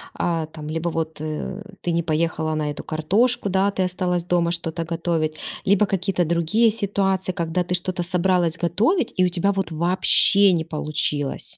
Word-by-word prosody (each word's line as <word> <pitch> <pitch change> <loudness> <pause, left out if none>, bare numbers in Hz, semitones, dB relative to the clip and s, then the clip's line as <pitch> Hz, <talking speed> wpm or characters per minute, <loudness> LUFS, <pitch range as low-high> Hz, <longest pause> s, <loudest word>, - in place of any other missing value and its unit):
а, 165 -2 -1
там 155 -1 -9
либо 165 +2 -1
вот, 160 -2 -4
э, 155 +6 -4 0.2
ты 175 - -1
не 170 0 +1
поехала 160 -1 -1
на 155 - -1
эту 145 - -7
картошку? 200 +8 +1
Да, 190 +1 +2
ты 190 -1 -1
осталась 180 -1 -1
дома 170 -1 +1
что-то 165 -1 -3
готовить, 165 -2 -1 0.3
либо 200 +1 +4
какие-то 190 -2 0
другие 170 +8 +2
ситуации, 195 -3 0
когда 170 0 -1
ты 180 +1 -1
что-то 180 0 -2
собралась 175 -2 +1
готовить, 220 - +1
и 185 - +5
у - - +2
тебя 180 +3 +1
вот 195 -4 -2
вообще 185 +4 +4
не 165 -2 0
получилось? 150 -2 -2
175 Hz, 170 wpm, -22 LUFS, 160-190 Hz, 0.3 s, и